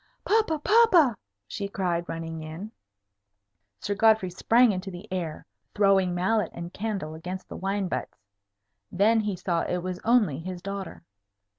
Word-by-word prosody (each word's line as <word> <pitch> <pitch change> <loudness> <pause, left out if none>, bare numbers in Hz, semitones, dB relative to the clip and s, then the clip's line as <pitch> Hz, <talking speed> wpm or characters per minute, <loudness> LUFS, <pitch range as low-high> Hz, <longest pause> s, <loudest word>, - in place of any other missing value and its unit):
"Papa! 430 -7 +2
papa!" 355 - +5 0.3
she 200 - -4
cried, 175 -3 -2
running 165 -1 -5
in. 160 +7 -7 1.1
Sir 205 - -2
Godfrey 215 -3 +3
sprang 230 +6 +4
into 190 0 -4
the 185 +3 -9
air, 170 -4 -4 0.3
throwing 195 -3 +3
mallet 190 +2 +1
and 170 +1 -7
candle 200 -7 -3
against 180 +4 -7
the - - -8
wine 195 +1 -2
butts. - - -4 0.7
Then 215 +5 +3
he 210 -3 -1
saw 170 -1 -1
it 180 -1 -2
was 185 0 -4
only 215 - +3
his 180 +2 -6
daughter. 195 0 -6
190 Hz, 145 wpm, -26 LUFS, 175-215 Hz, 1.1 s, papa